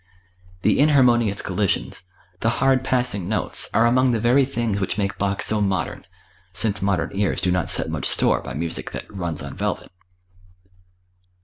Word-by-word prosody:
The - - +3
"inharmonious 125 -8 +3
collisions," 100 0 -1 0.3
the 115 - +1
"hard 135 -1 +2
passing 125 -9 0
notes" 110 - -1
are 115 - +3
among 130 +2 +3
the 115 - 0
very 125 +5 +4
things 120 -6 -2
which 95 - -1
make 100 -1 -2
Bach 100 0 0
so 110 -1 +1
modern; 95 -2 -2 0.5
since 105 +2 -1
modern 100 -1 0
ears 100 0 0
do 90 - 0
not 90 -1 0
set - - 0
much - - -3
store - - +2
by 60 - -7
music 80 +3 -3
that - - -6
"runs 85 -6 -1
on 70 -2 -7
velvet." - - -3
105 Hz, 165 wpm, -22 LUFS, 95-120 Hz, 0.5 s, very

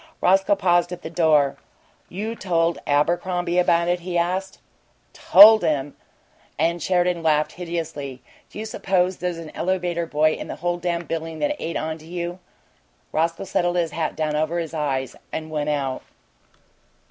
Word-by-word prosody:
Roscoe 195 +2 +3
paused 175 -2 +2
at 180 - -7
the 160 - -6
door. 155 -5 +3 0.5
"You 210 +5 -4
told 170 -5 0
Abercrombie 175 +4 +1
about 170 -1 +3
it?" 175 0 +1
he 175 0 -3
asked. 185 +3 -1 0.6
"TOLD 215 +3 +8
him!" 145 -3 -1 0.6
And 170 +2 0
Sheridan 180 0 +1
laughed 155 -1 +2
hideously. 160 -7 -5 0.3
"Do - - -12
you 215 - -4
suppose 185 -4 0
there's 180 -1 -3
an 165 -2 -8
elevator 175 -2 -1
boy 155 0 +2
in - - -6
the - - -5
whole 175 +1 -2
dam' 170 -1 -2
building 165 0 -4
that 295 - 0
ain't 165 - -3
on 160 0 -4
to 155 - -15
you?" 175 +1 -5 0.7
Roscoe 165 +3 0
settled 175 -2 0
his 170 -3 0
hat 160 +1 -2
down 155 -1 -1
over 155 +3 0
his 165 -2 -4
eyes 135 -5 -2 0.2
and 160 0 -5
went 150 -1 -2
out. 135 -3 -2
170 Hz, 160 wpm, -23 LUFS, 155-180 Hz, 0.7 s, TOLD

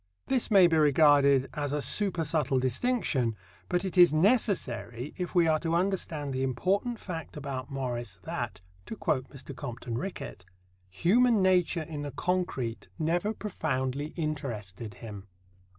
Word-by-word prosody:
This 260 -3 +1
may 195 -4 +7
be 165 -2 +3
regarded 145 -2 +5
as 145 -2 -2
a 150 - 0
supersubtle 155 - +1
distinction; 130 - 0 0.3
but 180 +1 0
it 185 -1 -1
is 175 -3 +8
necessary 155 - 0
if 180 0 -5
we 175 -2 +5
are 155 -1 +3
to 165 +1 -1
understand 170 -6 -1
the 130 - -2
important 190 - 0
fact 165 -5 -7
about 135 -3 -5
Morris 120 -7 -4
that - - -4 0.3
to - - -5
quote 155 -11 -1
Mr. 135 0 -9
Compton 120 -3 -5
Rickett 185 - -6 0.5
"human 210 - +3
nature 180 -3 +2
in 155 -2 -6
the 145 - -4
concrete 140 - -2
never 175 +6 0
profoundly 145 -10 -2
interested 115 - -4
him." 105 -4 -9
150 Hz, 140 wpm, -29 LUFS, 130-180 Hz, 0.5 s, is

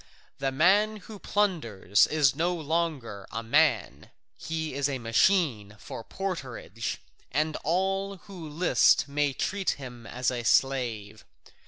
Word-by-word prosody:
The 135 0 0
man 200 +9 +3
who 215 -2 -10
plunders 120 - +1
is 145 -4 +2
no 175 +4 0
longer 155 - -2
a 115 +1 -4
man, 115 - +1 0.3
he 160 -2 -4
is 140 +1 0
a 135 - -2
machine 115 - +2
for 110 - -8
porterage, 130 - -5 0.3
and 155 +2 0
all 195 +4 -1
who 180 -4 -10
list 165 +1 +3
may 145 0 0
treat 195 +8 -2
him 125 -4 -9
as 125 +1 -1
a 125 -1 -3
slave. 115 -6 0
145 Hz, 130 wpm, -27 LUFS, 120-180 Hz, 0.3 s, man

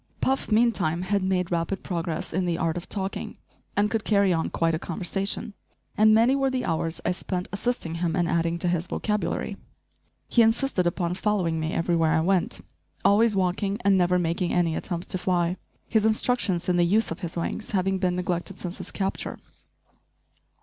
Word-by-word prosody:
Puff, 265 -3 0
meantime, 215 -7 +2
had 200 +2 +1
made 185 -2 0
rapid 170 +3 -1
progress 170 -4 -3
in 180 +1 0
the 170 -1 0
art 165 0 0
of 175 - -6
talking 195 -1 -3 0.4
and 205 +1 +4
could 225 -1 0
carry 200 -3 +3
on 165 -1 0
quite 165 0 +1
a 160 - 0
conversation 195 +5 -3 0.4
and 215 +1 +5
many 230 +5 +5
were 270 -1 +2
the 260 -1 -2
hours 165 +1 -1
I - - +2
spent 180 0 -3
assisting 200 -5 -2
him 165 -2 0
in 175 - +2
adding 170 0 0
to 175 - -2
his 175 0 0
vocabulary. 210 +2 -2 0.7
He 235 - +4
insisted 225 -4 +2
upon 175 0 -1
following 185 -4 0
me 160 0 -2
everywhere 165 -1 +2
I 160 - +3
went, 185 +1 0 0.4
always 215 +1 +4
walking 195 +2 0
and 200 -1 +5
never 180 -1 +3
making 170 +1 0
any 170 -2 +1
attempt 175 -1 -3
to 185 - 0
fly, 175 -1 +1 0.3
his 220 -2 +2
instructions 220 -4 +1
in 180 -1 +2
the 175 - +4
use 205 +5 +2
of 165 - -4
his 170 -1 -5
wings 190 +5 -3
having 190 -1 0
been 180 -1 +1
neglected 180 +1 -2
since 180 0 -5
his - - -6
capture. 195 -1 -3
180 Hz, 185 wpm, -26 LUFS, 170-205 Hz, 0.7 s, and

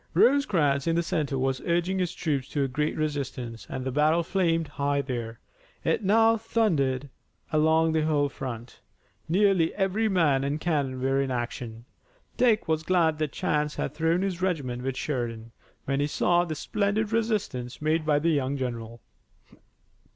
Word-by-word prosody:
Rosecrans 170 - +3
in 165 - +2
the 170 - +1
center 150 -5 -1
was 130 0 -1
urging 175 +2 0
his 180 -2 -1
troops 140 -5 -1
to 145 - 0
a - - +1
great 150 +4 -1
resistance 135 -6 -4
and 130 - -4
the 130 - -1
battle 155 +5 +3
flamed 165 -3 +1
high 145 0 -1
there. 120 -4 -4 0.4
It - - 0
now 225 +3 +4
thundered 160 - 0 0.5
along 160 +1 +3
the 160 - +2
whole 150 -2 +2
front. 125 -4 -7 0.5
Nearly 185 -2 +3
every 205 +3 +1
man 155 -8 +2
and 140 +2 -1
cannon 145 -6 -1
were 135 +1 +2
in 135 - -1
action. 120 -2 -4 0.5
Dick 225 -6 +3
was 160 -1 +1
glad 160 -3 +2
that 155 -3 -1
chance 150 0 -1
had - - -3
thrown 165 +3 +1
his 185 -2 -2
regiment 140 -10 -1
with 130 0 -3
Sheridan, 115 -5 -3 0.3
when 135 0 0
he 145 - +1
saw 175 +3 +2
the 160 -2 -4
splendid 205 +6 -1
resistance 205 - -1
made 155 +1 +1
by 150 -1 +2
the 165 +3 +2
young 140 -2 0
general. 115 -3 -5
150 Hz, 165 wpm, -27 LUFS, 135-175 Hz, 0.5 s, now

